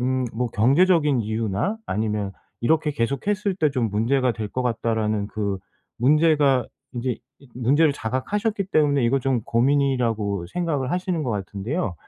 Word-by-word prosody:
음 130 +1 0
뭐 125 +1 -1
경제적인 145 - +3
이유나 110 - -1
아니면 105 -2 -2 0.3
'이렇게 155 +4 +2
계속했을 185 - -1
때 155 -5 +2
좀 125 -4 0
문제가 125 +4 +1
될 110 -2 -5
것 125 +4 -3
같다.'라는 110 -3 -1
그 100 -3 -2 0.4
문제가 145 -2 +3 0.3
인제 125 0 -2 0.2
이 140 - -19
문제를 140 +5 +3
자각하셨기 195 - -2
때문에 145 -4 +3
이거 135 +3 +2
좀 125 -3 0
고민이라고 115 -7 +1
생각을 150 - -2
하시는 180 -2 -1
것 125 - -2
같은데요. 105 - -3
130 Hz, 335 characters per minute, -23 LUFS, 110-150 Hz, 0.4 s, 경제적인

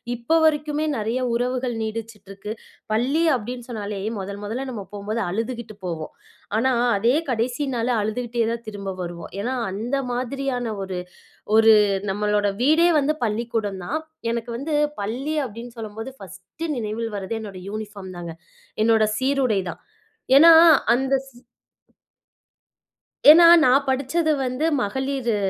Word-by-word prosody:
இப்ப 245 +8 +1
வரைக்குமே 300 0 +1
நெறைய 225 +3 -1
உறவுகள் 250 0 -1
நீடிச்சுட்டிருக்கு. 215 -2 -6 0.4
"பள்ளி" 265 +9 +1
அப்படின்னு 245 +2 -7
சொன்னாலே 205 -3 -5 0.2
முதல் 200 +1 -6
முதல்ல 245 +6 -4
நம்ம 220 - -5
போம்போது 210 +3 -3
அழுதுகிட்டு 230 +3 -4
போவோம். 160 -3 -5 0.4
ஆனா 240 +4 +2 0.3
அதே 235 +6 +2
கடைசி 245 +3 -1
நாளு 235 +1 0
அழுதுகிட்டே 235 +2 -2
தான் 235 0 -4
திரும்ப 200 -2 -6
வருவோம். 170 -1 -7
ஏன்னா, 245 +6 -2 0.2
அந்த 225 +7 -3 0.2
மாதிரியான 255 0 -2 0.2
ஒரு 190 -1 -5 0.6
ஒரு 220 0 +7 0.4
நம்மளோட 210 +1 +1
வீடே 315 +6 +5
வந்து 290 +1 +2
பள்ளிக்கூடம் 220 -3 -2
தான். 310 - -2 0.3
எனக்கு 235 0 -3
வந்து 290 +5 -3 0.3
பள்ளி 250 +9 -3
அப்படின்னு 235 +1 -9
சொல்லும்போது 225 +2 -7
பர்ஸ்ட்டு 195 - -8
நினைவில் 225 0 -3
வர்றது 200 +2 -4
என்னோட 200 -4 -8
யூனிபார்ம் 205 -3 -7
தாங்க. 170 -1 -6 0.5
என்னோட 225 0 +4
சீருடை 260 -6 +1
தான். - - -10 0.6
ஏன்னா 330 +4 +9 0.4
அந்த 265 +3 +1
சீ 240 -2 -18 1.9
ஏன்னா, 335 +3 +10 0.2
நான் 265 +2 +4
படிச்சது 280 +5 +1
வந்து 255 +5 -1 0.2
மகளிரு 265 +1 -1
230 Hz, 125 wpm, -23 LUFS, 210-260 Hz, 1.9 s, ஏன்னா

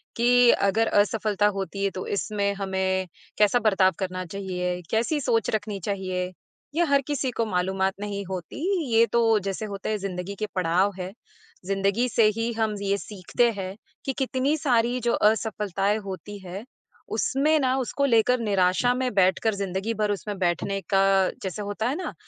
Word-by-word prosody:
कि 245 +1 +5
अगर 210 +3 +2
असफलता 205 0 +2
होती 195 0 -3
है, 195 - +2
तो 185 - -5
इसमें 200 0 -1
हमें 190 -1 -1 0.3
कैसा 210 +3 +4
बर्ताव 195 -4 +3
करना 185 -1 -3
चाहिए, 180 -1 -3
कैसी 235 +7 +1
सोच 225 -3 +1
रखनी 210 -1 -3
चाहिए? 185 -2 -2 0.4
ये 345 - +3
हर 280 -2 +3
किसी 285 -3 -1
को 230 -1 -1
मालूमात 190 -1 0
नहीं 205 -1 -4
होती। 185 -3 -6 0.4
ये 225 +1 +6
तो, 225 -1 +3
जैसे 195 +2 -4
होता 200 -1 -5
है, 215 - 0
ज़िंदगी 195 0 -5
के 215 - 0
पड़ाव 185 +3 +2
हैं, 180 +1 -4 0.5
ज़िंदगी 195 +5 +1
से 230 0 +3
ही 230 +1 0
हम 220 -1 0
ये 200 0 +1
सीखते 210 +4 0
हैं 190 -2 -5 0.3
कि 270 - -1
कितनी 265 +2 +1
सारी 245 -4 +1
जो 235 0 +1
असफलताएँ 210 -2 +1
होती 200 +2 -7
हैं, 190 +3 -8 0.5
उसमें 300 +3 +2
ना, 260 -2 +2
उसको 270 +2 0
लेकर 245 0 +3
निराशा 200 +2 +2
में 255 -1 -1
बैठकर, 195 +3 +3
ज़िंदगी 195 +3 -2
भर 210 -1 0
उसमें 205 0 -4
बैठने 190 +2 0
का, 195 -1 +4
जैसे 190 +1 -4
होता 205 +2 -2
है 270 - -1
ना 365 +2 -4
205 Hz, 165 wpm, -25 LUFS, 190-230 Hz, 0.5 s, ये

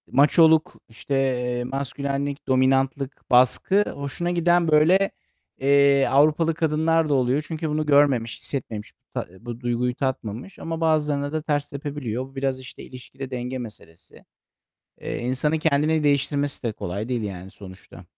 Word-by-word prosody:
Maçoluk, 160 +2 +4 0.2
işte, 115 +5 -6
eee, 125 -2 0
maskülenlik, 140 +2 -4
dominantlık, 135 +1 0
baskı 130 - +4
hoşuna 140 +5 -3
giden, 175 0 +2
böyle, 165 +6 +4 0.5
eee, 140 0 +4
Avrupalı 155 +4 +3
kadınlar 160 0 +1
da - - +2
oluyor. 130 +2 +1
Çünkü 160 -1 -4
bunu 155 +1 -1
görmemiş, 140 -6 +3
hissetmemiş, 110 -6 -5
bu - - -60
ta - - -3
bu 120 0 -8
duyguyu 120 0 -1
tatmamış. 130 - -4
Ama 165 0 -5
bazılarına 150 -3 +1
da 155 0 -2
ters 145 -2 -1
tepebiliyor. 140 -4 -4
Bu 135 +1 -18
biraz, 135 -1 -1
işte, 130 +1 -11
ilişkide 130 +1 -10
denge 125 +1 -4
meselesi. 105 -9 -12 0.8
Eee, - - -4
insanın 130 +6 0
kendini 155 0 +1
değiştirmesi 145 0 0
de 115 -3 -1
kolay 100 +3 -5
değil, 125 -3 -1
yani, 95 -2 -6
sonuçta. 95 -1 -13
140 Hz, 140 wpm, -24 LUFS, 125-150 Hz, 0.8 s, Maçoluk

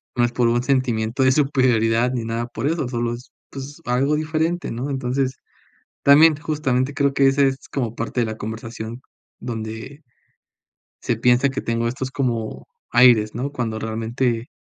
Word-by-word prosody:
no 120 - +2
es 120 - +1
por 120 0 +1
un 120 +1 +1
sentimiento 125 -2 0
de 130 - +5
superioridad 125 -4 +2
ni 120 -3 -2
nada 115 +1 -2
por 120 +2 -3
eso 155 -4 -1
solo 120 -1 -2
es 120 +3 -10 0.2
pues, 140 +4 -9
algo 135 +5 +1
diferente, 160 +3 -1
¿no? 125 +5 -4
Entonces, 130 0 -1 0.7
también, 150 +3 +7
justamente, 145 -3 -1
creo 140 -1 +1
que 135 0 +4
ese 135 +1 +4
es 135 0 -4
como 120 -5 -2
parte 115 +2 -3
de - - +1
la 110 0 -5
conversación 110 +2 -6 0.4
donde, 115 +5 -6 1.0
se 120 - -1
piensa 125 +4 +3
que 135 0 -3
tengo 115 0 -1
estos 130 +2 -4
como 115 -5 -3 0.2
aires, 120 -3 +5
¿no? 130 +4 -3
Cuando 120 -6 -3
realmente 115 +2 -2
125 Hz, 165 wpm, -22 LUFS, 115-140 Hz, 1.0 s, también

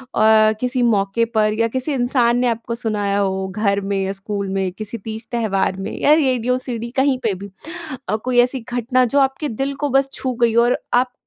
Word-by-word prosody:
अ, 215 0 +5
किसी 250 0 0
मौके 200 +3 +1
पर 215 0 +3
या 230 - +3
किसी 260 +3 -1
इंसान 245 -2 +2
ने 250 - +2
आपको 230 0 -2
सुनाया 205 -4 -1
हो 190 -1 -1
घर 200 -2 +1
में 200 0 -2
या 190 - -2
स्कूल 200 0 -4
में 190 -1 -1
किसी 215 +3 -5
तीज-त्योहार 220 -3 -2
में - - -4
या 295 - +5
रेडियो, 255 -5 +2
सीडी 235 -2 -5
कहीं 265 -1 +3
पे 220 -4 +1
भी? 200 +1 -9 0.6
अ, 215 - +2
कोई 245 +3 -1
ऐसी 250 +2 +1
घटना 250 +1 +2
जो 275 +4 +1
आपके 270 +3 0
दिल 275 +1 -1
को 290 - -1
बस 270 +1 +3
छू 260 - -3
गई 235 -1 +4
हो 235 - +5
और 240 +1 +2 0.2
आप 250 +1 +2
230 Hz, 210 wpm, -20 LUFS, 205-255 Hz, 0.6 s, अ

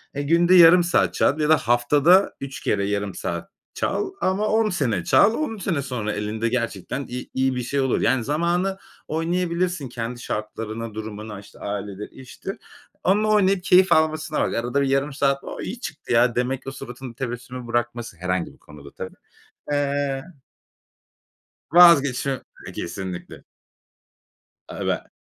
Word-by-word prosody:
Eee, 145 - -1
günde 170 +5 +4
yarım 175 +1 +8
saat 175 - +2
çal 150 - +2
ya 150 0 +1
da 155 - +6
haftada 145 - +4
3 135 0 -6
kere 100 -1 0
yarım 100 -1 -2
saat - - -4 0.2
çal 405 -2 -1
ama 195 +3 +1
10 220 -1 +2
sene 120 - 0
çal. 220 +3 +5
10 235 -6 -2
sene 170 -7 -1
sonra 120 -5 -3
elinde 110 +2 -2
gerçekten 115 +2 -3
i 125 +1 -6
iyi 130 0 +1
bir 125 - -2
şey 140 +3 -2
olur. 130 -2 +1
Yani, 130 -3 +2
zamanı 175 +7 0 0.3
oynayabilirsin 170 -1 -1
kendi 120 0 -5
şartlarına, 110 +1 -5
durumuna, 110 -1 -7
işte, 100 - -16
ailedir 100 0 -5
iştir. 130 +9 -8 0.5
Onunla 210 +4 +3
oynayıp, 195 -3 +3
keyif 185 0 +5
almasına 155 -1 +2
bak. - - 0
Ya, - - 0
arada 125 +4 0
bir 140 - +1
yarım 135 +2 +1
saat 140 0 +1
o, - - -7
iyi 230 +6 -5
çıktı 150 - -5
ya 120 0 +4
demek 130 +2 -1
o - - -3
suratın 125 -1 -8
tebessümü 125 0 -6
bırakması, 120 -4 -2
herhangi 90 0 -2
bir - - -22
konuda 75 -2 -14
tabii, - - -8 0.6
eee 140 -1 0 1.5
Vazgeçme 140 -6 +5 0.2
eee, - - -7
kesinlikle. 90 0 -6 1.2
Eve - - -3
135 Hz, 150 wpm, -23 LUFS, 115-170 Hz, 1.5 s, yarım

